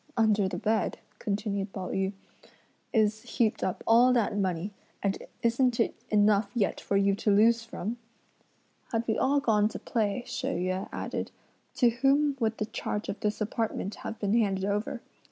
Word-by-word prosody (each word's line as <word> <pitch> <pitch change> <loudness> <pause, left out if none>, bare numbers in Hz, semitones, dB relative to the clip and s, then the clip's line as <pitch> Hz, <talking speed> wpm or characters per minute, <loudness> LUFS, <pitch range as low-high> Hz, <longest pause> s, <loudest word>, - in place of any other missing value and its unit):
"Under 215 -3 +3
the - - -4
bed," 220 -1 0 0.2
continued 200 -1 -2
Pao 185 -2 -4
yü, 190 +1 -1 0.8
"is 215 -2 +2
heaped 220 -3 0
up 185 - -2
all 240 +3 +6
that 230 -3 +1
money, 190 0 -1 0.3
and 200 -1 +1 0.3
isn't 240 +1 +2
it 230 - +2 0.2
enough 205 -1 +3
yet 210 -5 0
for 200 - 0
you 200 0 +3
to 205 +2 -1
lose 225 +3 +5
from?" 225 0 -5 0.9
"Had 230 -1 -1
we 220 - +2
all 280 +2 +2
gone 215 -6 +3
to - - -6
play," 220 0 -1
She 240 - -4
Yüeh 185 +2 -1
added, - - -4 0.5
"to 245 - +5
whom 275 +4 +2
would 225 -2 0
the 215 - -1
charge 210 -1 -4
of 200 - -4
this 210 +1 -2
apartment 215 -2 -2
have 225 - -5
been 205 -1 0
handed 195 -4 +2
over? 210 +5 -2
215 Hz, 170 wpm, -29 LUFS, 200-230 Hz, 0.9 s, all